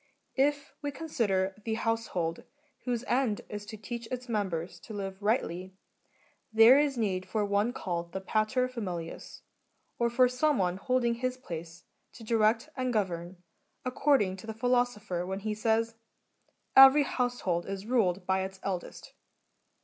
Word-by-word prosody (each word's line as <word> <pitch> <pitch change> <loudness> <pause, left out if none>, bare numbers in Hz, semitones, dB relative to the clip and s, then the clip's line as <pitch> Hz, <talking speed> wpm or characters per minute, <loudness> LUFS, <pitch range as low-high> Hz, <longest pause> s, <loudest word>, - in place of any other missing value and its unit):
If 285 +1 +1
we 290 - -2
consider 230 -11 -1
the 220 -1 -1
household, 220 -8 -2 0.4
whose 245 -2 -1
end 245 -5 +1
is 205 0 -6
to 215 - -7
teach 235 +2 -6
its 250 +1 -5
members 190 -7 -2
to 220 - -9
live 195 -1 -5
rightly, 190 -4 -1 0.8
there 225 +5 +8
is 290 -3 +1
need 190 -5 -1
for 215 -2 0
one 205 +3 +1
called 170 -7 -4
the 190 - -3
pater 215 +6 +1
familias^ 180 -10 -6 0.6
or 235 0 +2
for 250 +2 +4
some 270 +3 +1
one 180 -1 0
holding 240 +3 +1
his 255 +2 -2
place, 165 -7 -8 0.3
to 230 - -12
direct 225 +2 +2
and 255 -1 -1
gov 205 -5 +1
ern, 175 +2 -7 0.4
according 255 -7 +2
to 190 - -11
the 220 - -5
Philosopher 235 -6 0
when 190 +2 -4
he 215 +1 -2
says, 225 +1 +1 0.4
" - - -46 0.3
Every 270 +2 +9
household 245 -11 -1
is 195 0 -5
ruled 200 -7 +1
by 190 +1 +1
its 190 0 -5
eldest." 185 -3 -5
220 Hz, 155 wpm, -30 LUFS, 190-250 Hz, 0.8 s, Every